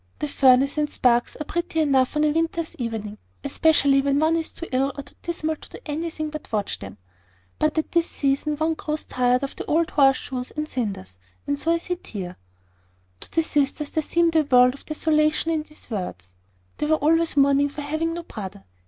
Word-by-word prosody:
The 300 - -2
furnace 275 +1 +4
and 295 0 +1
sparks 240 -4 +2
are 305 - -4
pretty 345 +1 -2
enough 275 -3 +2
on 300 - +3
a 305 - +3
winter's 330 +1 -1
evening, 220 -3 -4 0.2
especially 285 -4 +4
when 280 0 +1
one 315 +2 +3
is 325 -1 -2
too 335 - -7
ill 270 +2 +1
or 280 - -5
too 285 - -17
dismal 315 -2 -2
to - - -14
do - - -9
anything 310 0 -3
but 305 -1 -8
watch 210 -2 -1
them; 100 0 -9 0.6
but 310 +1 +1
at 315 - -1
this 340 -1 +2
season 280 +2 0
one 315 +2 +1
grows 305 -1 -4
tired 250 +1 +1
of 275 - -3
old 325 +2 +1
horse 270 -2 +5
shoes 255 -2 -5
and 305 0 -2
cinders; 195 - -4 0.3
and 285 0 -1
so 330 - +1
I 335 - +3
sit 355 +1 -5
here." 185 -4 -6 0.8
To - - -10
the 325 - +2
sisters 295 0 0
there 315 - 0
seemed 335 +2 +1
a 320 - +6
world 250 -3 +5
of 280 - -15
desolation 310 +1 +1
in 315 -1 +1
these 305 -4 -13
words. 95 - -5 0.5
They 300 - 0
were 315 - +4
always 325 +1 +2
mourning 280 +1 +4
for 295 +1 -7
having 315 +3 -2
no 345 - -5
brother. 200 - -8
295 Hz, 205 wpm, -24 LUFS, 255-315 Hz, 0.8 s, a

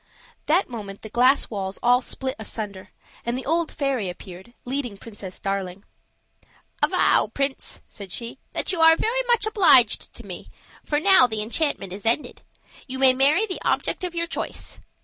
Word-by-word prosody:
That 340 +6 +3
moment 205 -5 -8
the 220 - -8
glass 255 +3 +3
walls 195 -2 -4
all 245 +1 +4
split 260 0 -5
asunder, 205 -3 -6 0.3
and 235 +1 -2
the 260 - -6
old 330 +2 0
fairy 265 -9 -1
appeared, 185 +6 -11
leading 250 -5 -3
Princess 200 -4 -9
Darling. 195 -1 -3 1.0
"Avow, - - +3
prince," 275 -1 -3
said 200 -4 -10
she, 235 +5 -5
"that - - -2
you 350 -3 -1
are 325 0 +8
very 475 +8 0
much 475 -3 +3
obliged 340 - +4
to - - -11
me, - - -8 0.3
for 295 - 0
now 375 -6 +6
the 220 -2 -2
enchantment 225 - -2
is 200 +1 -8
ended. 235 +6 0 0.5
You 260 0 -5
may 260 -1 +6
marry 285 +11 +4
the 375 -4 -4
object - - -1
of 355 -1 -4
your 335 0 0
choice. 335 - -6
255 Hz, 170 wpm, -24 LUFS, 205-310 Hz, 1.0 s, are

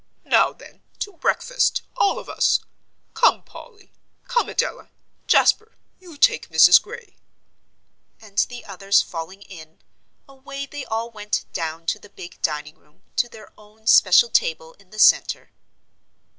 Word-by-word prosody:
Now - - +3
then, - - -17 0.2
to 410 - -5
breakfast, - - 0
all 405 - +1
of - - -9
us! - - +1 0.5
Come, - - +3
Polly 415 -5 -16 0.3
come, 485 0 0
Adela - - -3 0.4
Jasper, 435 +1 +3 0.2
you 350 -5 -14
take 155 - +2
Mrs. 160 +2 +7
Gray," 470 +2 -12 1.0
and 205 -2 -5
the 245 -1 -10
others 195 0 +1
falling 185 +5 -8
in, 160 -5 -14 0.5
away 275 +1 -8
they 285 -1 -8
all 225 +1 -4
went 210 -1 -3
down 165 0 -5
to - - -1
the 205 - -17
big 175 -3 -12
dining 150 0 -3
room, 150 - -32
to 240 - +1
their 220 -1 -15
own 215 +1 -22
special 205 +2 +5
table 160 0 0
in 195 -2 -23
the 215 - -14
centre. - - +3
210 Hz, 145 wpm, -22 LUFS, 170-275 Hz, 1.0 s, Mrs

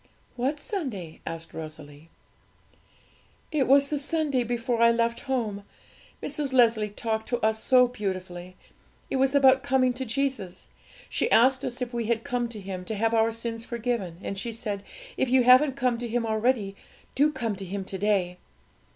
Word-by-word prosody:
'What 270 +5 -1
Sunday?' 250 - -5
asked 165 0 -6
Rosalie. 155 -1 -9 1.4
'It 295 -4 +1
was 275 +1 +5
the 295 - -1
Sunday 290 -3 0
before 235 0 -1
I 235 - +7
left 235 0 +1
home. 215 -6 -1 0.6
Mrs. 290 -2 -2
Leslie 230 -4 +4
talked 220 +1 -3
to 240 - 0
us 220 0 +1
so 250 -1 +5
beautifully; 185 -5 -5 0.6
it - - +1
was 270 +1 +2
about 265 -1 +6
coming 260 -2 +2
to 255 +2 -4
Jesus. 255 -7 -3 0.4
She - - -1
asked 260 +3 +4
us 250 +1 -3
if 245 0 -7
we 235 -1 -2
had 230 -1 0
come 245 -1 -2
to 225 -2 -7
Him 190 -2 -6
to 220 - -3
have 225 +2 +1
our 225 0 +3
sins 230 0 -5
forgiven; 235 -7 -3
and 195 - -4
she 235 +4 -4
said, 215 -3 -4 0.3
"If 265 - +1
you 255 0 +4
haven't 255 +3 +6
come 250 -3 0
to 240 - -4
Him 235 0 -1
already, 220 -2 0 0.4
do 295 +3 +3
come 235 -7 -2
to 195 - -6
Him 195 +1 -5
to 190 - -5
day." 190 -3 +1
235 Hz, 175 wpm, -26 LUFS, 205-260 Hz, 1.4 s, I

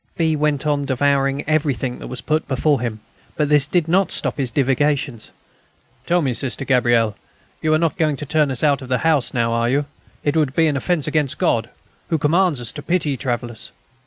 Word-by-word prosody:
B. 160 -2 +2
went 150 -1 0
on 145 -1 +1
devouring 140 +1 0
everything 140 -5 0
that - - -8
was 125 -1 -5
put 155 0 -1
before 140 0 +1
him; 110 -3 -4 0.4
but 150 -2 +1
this 145 -2 +5
did 170 0 +1
not 190 +3 +3
put - - -6
a - - 0
stop - - -1
to - - -1
his 130 - 0
divagations. 135 -1 0 0.8
"Tell 175 -1 +2
me, 130 -3 0
Sister 135 +2 -2
Gabrielle, 120 -5 +2 0.5
you 155 - +1
are - - +4
not 165 +2 0
going 155 -3 +1
to 150 - -5
turn 150 0 +2
us 130 0 -2
out 145 -2 +3
of 130 - -9
the 125 - +2
house 145 -7 +2
now, 115 -1 0
are 115 0 +1
you? 140 +3 +1 0.4
It 145 +1 0
would 150 -4 +1
be 165 - +4
an 150 -2 +1
offence 155 +1 0
against 150 -4 0
God, - - +1 0.4
who 160 - +1
commands 165 0 +2
us 120 - -5
to 145 - -8
pity 160 -4 0
travellers. 120 -3 -4
145 Hz, 220 wpm, -20 LUFS, 125-155 Hz, 0.8 s, this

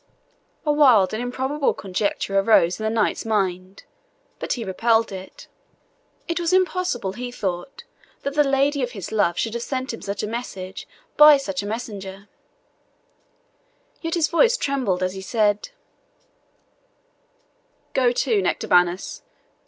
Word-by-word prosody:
A 300 - +3
wild 250 -11 +5
and 220 - -2
improbable 265 +4 -1
conjecture 195 0 -1
arose 195 -3 +3
in - - -5
the 220 - +1
knight's 220 -1 0
mind, 190 -3 -2 0.6
but - - -2
he 240 - -4
repelled 225 +4 +1
it. 190 0 -10 0.8
It 335 +1 -1
was 345 +1 0
impossible, 365 - 0
he 245 +3 -6
thought, 190 - -5 0.4
that 280 - -2
the 295 0 +4
lady 275 +1 +1
of 245 0 -2
his 195 -6 -7
love 190 -6 +1
should 225 - -1
have 235 - -3
sent 260 0 -3
him 230 - -8
such 200 +1 -4
a - - -2
message 195 -5 -6 0.3
by 300 -1 +9
such 195 -9 -3
a 205 - -6
messenger; 200 -3 -6 1.7
yet 330 0 -2
his 325 -2 +2
voice 465 +8 +3
trembled 250 - -1
as 185 0 -1
he 190 - -7
said, 210 - 0 2.2
"Go 255 -2 +3
to, 240 -4 +1
Nectabanus. 180 0 +1
225 Hz, 140 wpm, -23 LUFS, 195-275 Hz, 2.2 s, by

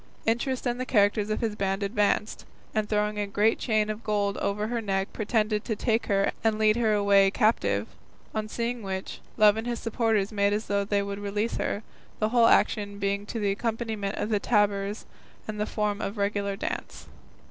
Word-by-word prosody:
Interest 240 +4 0
and 245 0 -1
the 255 - -2
characters 205 -2 +3
of 215 - -1
his 220 -3 -1
band 195 0 -1
advanced, 210 +1 0 0.3
and 215 -1 -1
throwing 210 0 0
a 205 - -1
great 210 +3 +2
chain 215 -3 +1
of 215 +1 -5
gold 205 -2 0
over 210 +1 -1
her 235 +1 -2
neck 195 -2 -2
pretended 215 -1 0
to 220 - -2
take 225 +1 0
her 195 -1 +2
and 220 -1 +2
lead 215 0 +4
her 230 -2 +2
away 200 -1 +5
captive, 110 - +1 0.5
on 215 -1 -2
seeing 235 +2 -3
which, 190 -2 -5 0.2
Love 215 -1 +6
and 225 +2 -3
his 240 -1 -1
supporters 225 -3 0
made 200 -1 +2
as 215 +1 -1
though 200 0 0
they 200 0 0
would 200 0 -5
release 205 +3 -2
her, 205 - -2 0.3
the 215 - 0
whole 235 0 +5
action 205 -3 +2
being 200 +1 -1
to 230 - -4
the 205 -2 +1
accompaniment 220 -1 -2
of 210 - -2
the 210 -2 +2
tabors 205 -1 +1 0.4
and 215 - -3
in 210 - -8
the 210 - 0
form 210 -1 -1
of 200 +3 -4
a - - -6
regular 200 0 0
dance. - - -5
210 Hz, 200 wpm, -27 LUFS, 200-220 Hz, 0.5 s, Love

